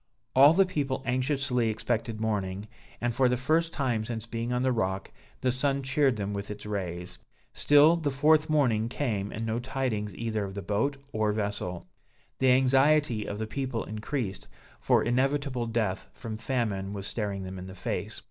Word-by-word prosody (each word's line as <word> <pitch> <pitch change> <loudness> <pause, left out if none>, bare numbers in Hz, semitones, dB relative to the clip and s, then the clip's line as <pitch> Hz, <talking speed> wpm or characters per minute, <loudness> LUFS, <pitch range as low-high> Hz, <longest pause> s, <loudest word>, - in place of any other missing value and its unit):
All 140 +4 +8
the 195 +2 +5
people 140 -7 -2
anxiously 130 -2 +1
expected 110 0 -2
morning, 105 -2 -2 0.3
and, 120 0 0
for 130 +1 +3
the 125 - +1
first 160 +6 +1
time 125 -7 0
since 115 0 -4
being 115 +1 -3
on 125 +1 0
the 130 - +3
rock, 95 -5 -1 0.3
the 130 - +2
sun 135 +2 +1
cheered 135 -1 +2
them 100 -1 -3
with 100 0 -5
its 105 0 -7
rays. 90 -4 -4 0.3
Still 145 +3 +6
the 160 -4 -1
fourth 150 +3 +3
morning 120 -7 +2
came 110 -7 -2
and 115 +1 -4
no 115 +1 -1
tidings 120 -6 -2
either 110 -2 -2
of 95 -1 -6
the 100 - -5
boat 115 +7 0
or 110 -1 +1
vessel. 100 - -3 0.5
The 130 - +4
anxiety 135 -2 +4
of 100 - -4
the 110 - -2
people 130 0 -3
increased, 110 -1 -4 0.3
for - - +3
inevitable 130 0 0
death 110 -5 -1
from 115 -3 -6
famine, 110 -4 -2
was 100 -1 -5
staring 100 -3 -3
them 95 0 -6
in 90 - -7
the 95 - -9
face. - - -4
115 Hz, 175 wpm, -28 LUFS, 105-135 Hz, 0.5 s, All